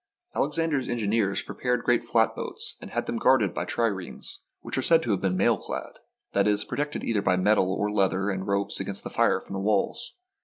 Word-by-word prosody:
Alexander's 150 -2 0
engineers 110 -3 0
prepared 125 -2 -1
great 120 -1 +2
flatboats 115 -1 0
and - - -8
had - - -2
them 120 - -2
guarded 115 -8 +3
by - - -2
triremes, 100 -6 -2 0.2
which - - -5
are 130 - +1
said 165 +4 +4
to 115 - -1
have 100 - 0
been 95 -1 +1
mail 110 +3 +3
clad - - -6 0.2
— - - -51
that 100 +1 +3
is, 105 0 +2
protected 145 +1 -3
either 110 -3 +1
by 90 -2 +2
metal 95 0 +3
or 105 +2 0
by 105 - -3
leather 95 0 +1
and 95 0 -4
ropes 100 0 0
against 95 0 -4
the - - -6
fire - - +3
from - - -11
the 95 - -2
walls. 105 - 0
105 Hz, 215 wpm, -27 LUFS, 100-120 Hz, 0.2 s, said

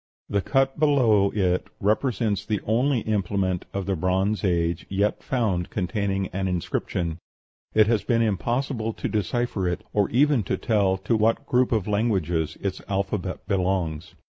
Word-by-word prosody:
The 100 0 +1
cut 135 +5 +1
below 120 -10 +4
it 90 -3 0
represents 105 -2 0
the 105 -1 -1
only 120 +3 +2
implement 100 -3 -1
of 100 -1 -3
the 95 0 0
Bronze 95 +5 0
Age 85 -2 0
yet 100 +2 0
found 105 -9 -1
containing 95 0 -1
an 95 +1 -2
inscription. 85 -1 -2 0.6
It 110 0 +6
has 110 -1 +1
been 115 -2 +2
impossible 115 +2 -1
to - - -4
decipher 105 -1 -1
it, 85 - -2
or 105 -2 +2
even 140 +1 +3
to 95 - -1
tell 100 -4 +1
to 95 +5 0
what 110 +1 +2
group 125 0 +2
of 110 -4 0
languages 95 -7 0
its 100 -2 -3
alphabet 100 -1 -2
belongs. 90 -5 -1
100 Hz, 150 wpm, -25 LUFS, 95-115 Hz, 0.6 s, It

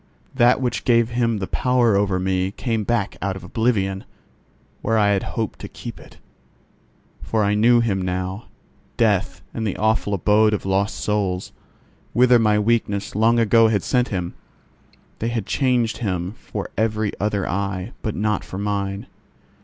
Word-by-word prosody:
That 125 -1 +4
which 125 -2 -2
gave 115 -2 +3
him 115 -2 +1
the 100 - -3
power 125 -1 +2
over 100 -2 +1
me 95 0 0
came 110 +2 -2
back 110 -2 -1
out 100 -1 -1
of 95 - -9
oblivion, 100 -5 0 0.8
where 115 - +1
I 105 -1 +4
had 100 -2 +2 0.2
hoped - - -2
to - - -7
keep - - -9
it. - - -16 1.0
For 110 -1 0
I 100 0 +2
knew 120 +3 +4
him 100 -5 0
now. 95 +3 -3 0.5
Death 95 -5 +1
and 110 -1 -2
the 100 - -3
awful 110 -2 +1
abode 105 +3 +3
of 100 - -6
lost 95 +2 0
souls, 100 -3 -1 0.6
whither 125 0 +5
my 105 -2 +3
weakness 105 -2 0
long 115 +3 +3
ago 115 0 +5
had 105 -4 +1
sent 125 -1 +1
him—they 90 +3 -8
had 115 -4 -2
changed 120 -4 +1
him 95 -5 -2
for - - -7
every 110 -1 0
other 105 -1 -1
eye, 95 +2 -2
but 110 - -3
not 105 0 0
for 95 - -8
mine. 100 -1 -2
105 Hz, 160 wpm, -22 LUFS, 95-115 Hz, 1.0 s, whither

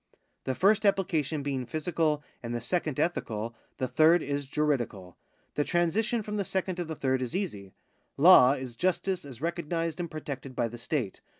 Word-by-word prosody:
The 130 - -1
first 210 - +4
application 165 -7 +1
being 135 -3 -2
physical 155 0 0 0.2
and 120 0 -4
the - - -1
second 155 +3 -2
ethical, 115 -9 -1 0.2
the 130 - -1
third 155 +6 +5
is 140 0 -3
juridical. 125 - -1 0.4
The 145 - +1
transition 210 +8 +1
from 210 0 -4
the 200 - 0
second 190 -1 -2
to 175 - -1
the 160 0 -5
third 130 -2 0
is 125 +6 -3
easy. 105 - -4 0.4
Law 140 -4 +8
is 130 -3 -6
justice 185 +2 0
as 130 -3 -10
recognised 165 -1 -2
and 170 -1 -3
protected 140 -4 -6
by 120 -2 0
the 120 +1 -9
state. 125 -5 -3
150 Hz, 175 wpm, -29 LUFS, 130-175 Hz, 0.4 s, Law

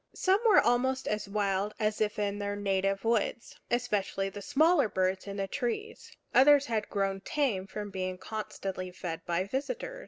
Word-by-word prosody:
Some 380 +1 +3
were 425 - +7
almost 260 +2 +1
as 210 -1 -2
wild 200 0 0
as 215 -1 0
if 210 -1 0
in 205 -1 -1
their 205 0 -2
native 195 0 0
woods, 230 0 0
especially 210 -5 0
the 205 +1 -8
smaller 290 - +3
birds 190 +1 -1
in 200 0 -5
the 195 0 -1
trees; 280 - -4 0.2
others 285 +1 +6
had 220 -5 -2
grown 195 -1 -1
tame 210 -6 -1
from 205 0 -6
being 185 -1 -3
constantly 195 -3 -5
fed 175 -2 -6
by 175 +1 +1
visitors. 485 - -4
210 Hz, 165 wpm, -30 LUFS, 195-260 Hz, 0.2 s, were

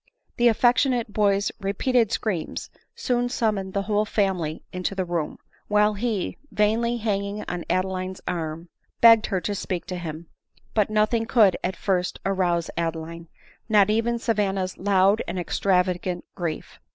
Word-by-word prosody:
The 240 - +4
affectionate 240 0 +2
boy's 200 -1 +2
repeated 220 +3 +1
screams 185 -8 -3 0.2
soon 245 -1 0
sum 225 -3 +1
moned 190 -1 -5
the 200 - 0
whole 210 0 +1
family 190 -7 -1
into 180 +2 -3
the 190 -1 -1
room, 170 -3 -3 0.3
while 210 0 +3
he, 210 -2 -2
vainly 230 +3 +1
hanging 205 -2 -2
on 175 -1 -4
Adeline's 185 0 -1
arm, 165 -1 -4 0.3
begged 230 -1 +7
her 190 -3 0
to 205 - -2
speak 185 -3 -3
to 180 -1 -5
him; 165 -1 -6 0.5
But 210 -2 +2
nothing 215 +2 +1
could 220 -6 +5
at 185 0 -1
first 185 -1 -1
rouse 180 -3 0
Adeline, 165 0 -4 0.4
not 210 -1 +5
even 230 +2 +1
Sa 230 0 0
vanna's 195 -3 -1
loud 195 +2 +3
and 175 - -4
extravagant 180 0 0
grief. 170 -3 -5
195 Hz, 150 wpm, -24 LUFS, 180-215 Hz, 0.5 s, begged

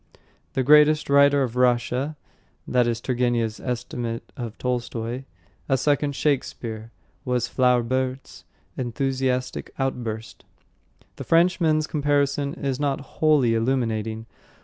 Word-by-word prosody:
"The 130 - 0
greatest 150 +1 +5
writer 140 0 +5
of 125 -2 -4
Russia." 125 +4 +1 0.5
That 125 -1 +2
is 115 -1 -1
Turgenev's 120 -3 0
estimate 120 -2 -4
of 120 -5 -6
Tolstoy. 125 0 -3 0.4
"A 135 - +3
second 145 +1 +1
Shakespeare!" 115 -6 -2 0.3
was 125 -1 0
Flaubert's 130 +1 0 0.3
enthusiastic 130 +1 -2
outburst. 115 -5 -4 0.7
The - - -5
Frenchman's 165 -2 +3
comparison 145 -1 0
is 135 -5 -3
not 140 -2 0 0.2
wholly 150 -7 +4
illuminating. 115 -2 -1
130 Hz, 105 wpm, -24 LUFS, 120-140 Hz, 0.7 s, greatest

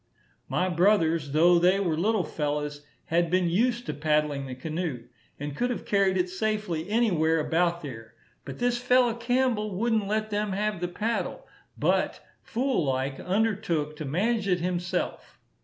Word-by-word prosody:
My 185 - +1
brothers, 170 -5 +2
though 170 +4 +5
they 180 +3 +4
were 175 -5 0
little 205 +4 +1
fellows, 150 -1 -3 0.2
had 170 +1 +1
been 180 0 +2
used 240 +5 +1
to - - -3
paddling 150 -2 0
the 130 - -6
canoe, 155 -2 -4 0.4
and 145 0 -5
could 245 +8 0
have 245 - -4
carried 195 -2 +2
it 180 0 +1
safely 185 -3 -2
anywhere 175 -8 +2
about 170 +2 +1
there; 115 -6 -9 0.3
but - - -8
this 245 0 +1
fellow 250 -1 +3
Campbell 235 -4 0
wouldn't 220 0 +1
let 215 +1 -1
them 205 -1 -1
have 205 -2 -1
the 175 - 0
paddle, 220 +6 -3 0.3
but, - - +1 0.2
fool 250 - 0
like, 135 0 -1
undertook 185 -7 0
to 155 - -5
manage 200 - 0
it 180 -2 +2
himself. 180 +1 -3
180 Hz, 155 wpm, -27 LUFS, 155-215 Hz, 0.4 s, though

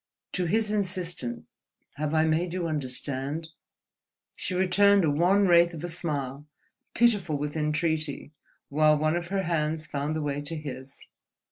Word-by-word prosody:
To 180 - -1
his 215 +3 +1
insistent 180 - -2 0.5
"Have 150 +2 -2
I 155 0 +4
made 165 +2 0
you 180 -2 -1
understand?" 145 +1 -3 0.9
she 185 - -3
returned 195 +1 +4
a 150 - +2
wan 180 +7 +3
wraith 170 -1 +5
of 160 - -8
a - - -2
smile, 145 -4 -3 0.5
pitiful 205 -10 +3
with 150 +1 -4
entreaty, 155 -1 -1 0.4
while 155 +1 +4
one 155 +2 +1
of 175 0 -3
her 195 +1 -1
hands 155 -2 -1
found 145 +1 -3
the 155 - -2
way 145 0 -2
to 150 +3 -6
his. 135 -3 -8
155 Hz, 150 wpm, -27 LUFS, 145-175 Hz, 0.9 s, wraith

